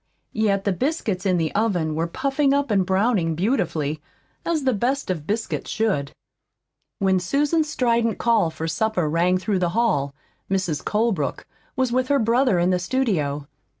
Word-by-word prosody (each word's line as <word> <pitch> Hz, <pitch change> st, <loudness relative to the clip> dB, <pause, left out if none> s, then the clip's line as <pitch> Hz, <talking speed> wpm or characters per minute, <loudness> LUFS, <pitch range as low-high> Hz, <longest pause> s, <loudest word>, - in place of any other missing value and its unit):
Yet 205 Hz, -3 st, +1 dB
the 200 Hz, -, +1 dB
biscuits 210 Hz, -, -1 dB
in 185 Hz, -1 st, +2 dB
the 160 Hz, -2 st, -1 dB
oven 185 Hz, -8 st, 0 dB
were 165 Hz, +2 st, -1 dB
puffing 275 Hz, -, +1 dB
up 285 Hz, -4 st, 0 dB
and 195 Hz, -2 st, +3 dB
browning 190 Hz, -4 st, +1 dB
beautifully, 160 Hz, -, -1 dB, 0.4 s
as 320 Hz, -4 st, -1 dB
the 260 Hz, -1 st, +2 dB
best 245 Hz, +2 st, -1 dB
of 155 Hz, -5 st, -5 dB
biscuits 220 Hz, +2 st, -2 dB
should. 170 Hz, -11 st, 0 dB, 0.9 s
When 190 Hz, -1 st, +2 dB
Susan's 295 Hz, -, +1 dB
strident 235 Hz, -5 st, +1 dB
call 230 Hz, -8 st, +2 dB
for 160 Hz, 0 st, -5 dB
supper 185 Hz, -1 st, 0 dB
rang 175 Hz, +4 st, +2 dB
through 190 Hz, +1 st, -1 dB
the 175 Hz, -1 st, +1 dB
hall, 145 Hz, -12 st, +1 dB, 0.3 s
Mrs. 185 Hz, -6 st, -1 dB
Colebrook 210 Hz, -, -1 dB, 0.3 s
was 260 Hz, -2 st, 0 dB
with 255 Hz, +1 st, +1 dB
her 285 Hz, -, +3 dB
brother 235 Hz, -2 st, +2 dB
in 175 Hz, +1 st, +2 dB
the 180 Hz, -, +1 dB
studio. 175 Hz, -, -1 dB
200 Hz, 160 wpm, -23 LUFS, 170-245 Hz, 0.9 s, and